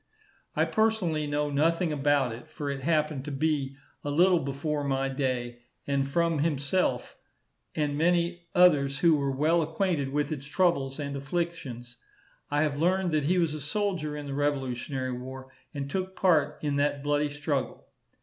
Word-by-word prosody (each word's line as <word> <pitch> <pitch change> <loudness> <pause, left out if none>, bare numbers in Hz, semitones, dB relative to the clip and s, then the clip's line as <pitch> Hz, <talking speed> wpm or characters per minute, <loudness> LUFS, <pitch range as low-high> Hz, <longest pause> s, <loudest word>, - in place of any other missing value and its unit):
I - - +3
personally 190 -9 +1
know 145 0 -1
nothing 165 +4 +2
about 140 -4 +2
it, 120 +1 -11
for 145 -1 -4
it 135 -1 -5
happened 150 -2 0
to 150 - -5
be 140 -1 0 0.3
a 145 - -3
little 175 +4 +4
before 145 +1 -2
my 135 -1 0
day; 125 -3 -2 0.2
but 140 -1 0
from 165 +2 +1
himself, 145 -2 0 0.6
and 145 -2 0
many 170 +2 +1
others 145 -6 +5
who 170 -2 +6
were 140 -2 0
well 155 +5 +2
acquainted 160 -3 0
with 145 +2 -1
its 140 -3 -4
troubles 150 -5 +1
and 140 -2 -4
afflictions, 140 -5 -4 0.5
I 145 +1 +2
have 145 -2 -1
learned 185 +1 +2
that 155 -2 +1
he 180 +5 +2
was 165 -4 +2
a 155 - -5
soldier 155 -2 -2
in 145 - -6
the 140 - -5
revolutionary 135 -2 -1
war, 130 +1 -8 0.2
and 140 -3 -4
took 190 +5 -3
part 155 -6 +2
in 145 -1 0
that 145 0 0
bloody 145 0 +1
struggle. 145 -3 -3
145 Hz, 165 wpm, -28 LUFS, 140-165 Hz, 0.6 s, who